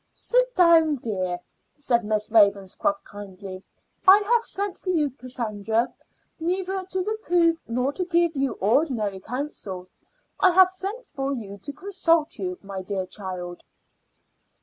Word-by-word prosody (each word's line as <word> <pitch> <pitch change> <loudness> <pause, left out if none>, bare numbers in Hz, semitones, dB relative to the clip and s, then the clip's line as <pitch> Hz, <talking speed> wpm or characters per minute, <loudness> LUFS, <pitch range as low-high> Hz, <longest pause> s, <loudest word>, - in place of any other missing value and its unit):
"Sit - - +1
down, 330 -4 +6
dear," 185 -8 -3 0.4
said 245 -5 +1
Miss 215 0 -1
Ravenscroft 205 +7 +3
kindly. 195 -2 -9 0.5
"I 380 +2 +10
have 460 +3 +2
sent 400 -3 -4
for 370 - -5
you, 305 -6 +2
Cassandra, 230 -3 -2 0.5
neither 375 +3 -1
to 375 0 -2
reprove 350 -6 +1
nor 250 +4 0
to 365 - -2
give 340 -2 +2
you 275 -1 0
ordinary 215 - +1
counsel. 200 -7 -6 0.5
I 370 -2 +5
have 370 0 +7
sent 395 +7 -5
for 275 0 -3
you 205 -6 -6
to 285 - -7
consult 335 - 0
you, 180 -2 -3
my 195 -1 -6
dear 190 0 -3
child." 180 -2 -7
275 Hz, 135 wpm, -25 LUFS, -, 0.5 s, I